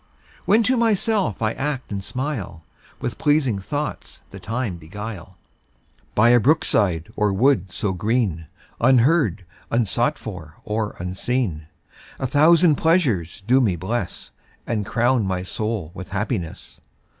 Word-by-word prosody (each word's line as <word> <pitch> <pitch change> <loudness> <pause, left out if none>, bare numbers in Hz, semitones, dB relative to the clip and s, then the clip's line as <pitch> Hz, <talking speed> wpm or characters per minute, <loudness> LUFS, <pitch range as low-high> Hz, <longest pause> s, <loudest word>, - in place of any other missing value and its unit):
When 220 +3 +4
to 255 +4 +2
myself 215 - +1
I 110 - +2
act 135 -2 -3
and 100 -1 -3
smile, 120 - -4 0.4
With - - -4
pleasing 145 -8 +2
thoughts 145 +9 -5
the - - -9
time 115 -5 -3
beguile, 95 +2 -8 0.8
By 110 +3 +5
a 120 0 +6
brook 150 +8 +3
side 85 -6 0
or 105 -1 +2
wood 100 -3 +2
so 100 +1 -1
green, 100 -5 -1 0.3
Unheard, 125 - +3 0.2
unsought 120 +5 +1
for, 85 - -8
or 105 0 -2
unseen, 90 -2 -2 0.5
A - - -3
thousand 155 +3 +5
pleasures 120 - +1
do 130 +4 +4
me 100 -8 +2
bless, 95 +3 -4 0.3
And 110 -3 -2
crown 120 0 +2
my 90 -1 -2
soul 105 -3 -3
with 95 -1 -8
happiness. 95 -4 -4
110 Hz, 135 wpm, -22 LUFS, 95-135 Hz, 0.8 s, a